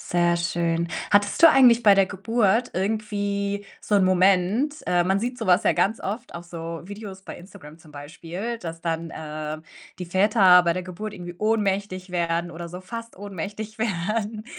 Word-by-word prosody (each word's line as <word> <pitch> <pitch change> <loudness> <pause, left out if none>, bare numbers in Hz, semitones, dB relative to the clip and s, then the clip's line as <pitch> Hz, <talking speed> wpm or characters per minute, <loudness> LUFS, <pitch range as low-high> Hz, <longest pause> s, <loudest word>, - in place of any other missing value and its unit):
Sehr 175 0 +1
schön. 170 0 -1 0.2
Hattest 205 +7 +2
du 330 - +11
eigentlich 245 -4 +6
bei 205 - +7
der 195 -1 +4
Geburt 225 +4 0
irgendwie 200 0 -2
so 205 - +1
'n 195 - +4
Moment, 190 +9 +2
äh 175 -1 +3
man 190 +2 +1
sieht 245 +4 -3
so 235 - -5
was 180 +4 +4
ja - - +4
ganz 220 +4 +1
oft 220 +3 -6
auf 170 - -9
so 165 -1 -7
Videos 200 -1 -9
bei - - -9
Instagram 175 -4 -13
zum 160 -3 -18
Beispiel, 170 +10 -6
dass, 165 -6 -6
ähm, 165 0 -2
dann 155 0 -6 0.3
die 180 - -5
Väter 190 0 +5
bei 170 -1 +2
der 185 +1 -4
Geburt 195 +4 -7
irgendwie 175 -1 -8
ohnmächtig 200 -3 -1
werden 170 0 -1
oder 170 +1 -7
so 180 +2 -8
fast 230 +4 -8
ohnmächtig 205 +2 -7
werden. 215 +2 -2
190 Hz, 175 wpm, -24 LUFS, 170-215 Hz, 0.3 s, du